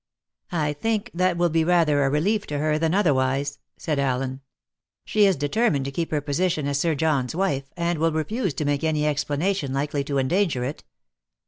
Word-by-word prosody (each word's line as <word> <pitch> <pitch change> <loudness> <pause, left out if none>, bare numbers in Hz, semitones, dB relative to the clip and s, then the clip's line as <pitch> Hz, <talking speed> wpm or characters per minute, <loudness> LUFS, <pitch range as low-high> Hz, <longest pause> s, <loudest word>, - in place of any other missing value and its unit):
"I 150 -2 0
think 225 +7 -2
that 180 0 +1
will 175 -1 +2
be 165 0 +2
rather 160 -4 +3
a 135 - +2
relief 195 +9 0
to 145 - -3
her 155 +1 +1
than 165 +2 +1
otherwise," 140 -5 +1 0.2
said 150 -4 -2
Allen. 130 0 -1 0.6
"She 210 -1 +4
is 190 - +3
determined 145 - +1
to 140 - -3
keep 165 +4 -2
her 150 -2 -1
position 155 +2 0
as 140 0 0
Sir 165 +1 +1
John's 145 -3 0
wife, 140 -8 -1
and 170 -1 -1
will 165 +1 +2
refuse 170 - -2
to 150 - -2
make 145 +1 0
any 155 -2 +1
explanation 150 +2 -1
likely 140 +1 -1
to 140 -1 -2
endanger 140 -1 +1
it. 135 +4 -5
150 Hz, 190 wpm, -24 LUFS, 140-175 Hz, 0.6 s, She